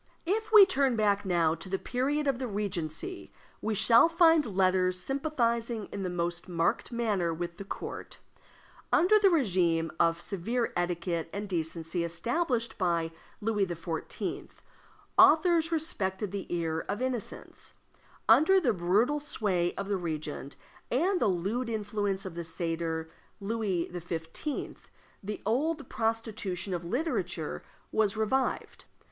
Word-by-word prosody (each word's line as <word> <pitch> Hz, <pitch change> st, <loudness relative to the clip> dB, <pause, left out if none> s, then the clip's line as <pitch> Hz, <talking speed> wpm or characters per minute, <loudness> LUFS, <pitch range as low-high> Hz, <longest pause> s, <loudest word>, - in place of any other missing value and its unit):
If 435 Hz, +5 st, -1 dB
we 425 Hz, -3 st, +10 dB
turn 275 Hz, -8 st, +1 dB
back 205 Hz, -2 st, +2 dB
now 170 Hz, -4 st, +2 dB
to 165 Hz, +3 st, -8 dB
the 195 Hz, -, 0 dB
period 275 Hz, +8 st, -1 dB
of 270 Hz, -3 st, +1 dB
the 260 Hz, -, -2 dB
Regency, 200 Hz, -, -4 dB, 0.3 s
we 215 Hz, 0 st, -1 dB
shall 235 Hz, -, +6 dB
find 330 Hz, -2 st, +5 dB
letters 185 Hz, -1 st, +3 dB
sympathizing 235 Hz, -, -1 dB
in 200 Hz, -, -4 dB
the 185 Hz, -, -2 dB
most 175 Hz, 0 st, -3 dB
marked 170 Hz, +6 st, 0 dB
manner 210 Hz, -8 st, 0 dB
with 170 Hz, +1 st, -5 dB
the -, -, -6 dB
court. 195 Hz, -, -7 dB, 0.7 s
Under 425 Hz, +5 st, +5 dB
the 400 Hz, -2 st, +6 dB
regime 180 Hz, -, +2 dB
of 165 Hz, 0 st, +3 dB
severe 225 Hz, +7 st, -2 dB
etiquette 175 Hz, -1 st, -1 dB
and 205 Hz, +1 st, -4 dB
decency 165 Hz, -1 st, -2 dB
established 235 Hz, -, -1 dB
by 170 Hz, -3 st, +1 dB, 0.3 s
Louis 210 Hz, -2 st, +1 dB
XIV., 165 Hz, -1 st, -5 dB, 0.7 s
authors 330 Hz, +1 st, +6 dB
respected 205 Hz, -, -2 dB
the 200 Hz, -1 st, -5 dB
ear 165 Hz, -2 st, -1 dB
of 205 Hz, -, -1 dB
innocence; 255 Hz, -3 st, -5 dB, 0.5 s
under 380 Hz, +6 st, +6 dB
the 260 Hz, -10 st, +2 dB
brutal 205 Hz, +11 st, +2 dB
sway 195 Hz, -12 st, -1 dB
of 200 Hz, -, -4 dB
the 200 Hz, -1 st, 0 dB
regent, 155 Hz, -4 st, -5 dB, 0.3 s
and 355 Hz, +9 st, +1 dB
the -, -, +4 dB
lewd 200 Hz, +7 st, -1 dB
influence 205 Hz, -2 st, -2 dB
of 185 Hz, -, -5 dB
the 170 Hz, 0 st, -5 dB
satyr 165 Hz, -1 st, -3 dB, 0.3 s
Louis 200 Hz, -4 st, -1 dB
XV., 170 Hz, -, -5 dB, 0.3 s
the 210 Hz, 0 st, -6 dB
old 285 Hz, +6 st, 0 dB
prostitution 220 Hz, -4 st, -2 dB
of 175 Hz, -1 st, -3 dB
literature 260 Hz, -, -2 dB, 0.3 s
was 215 Hz, -1 st, +1 dB
revived. 255 Hz, +5 st, -1 dB
200 Hz, 135 wpm, -29 LUFS, 175-255 Hz, 0.7 s, we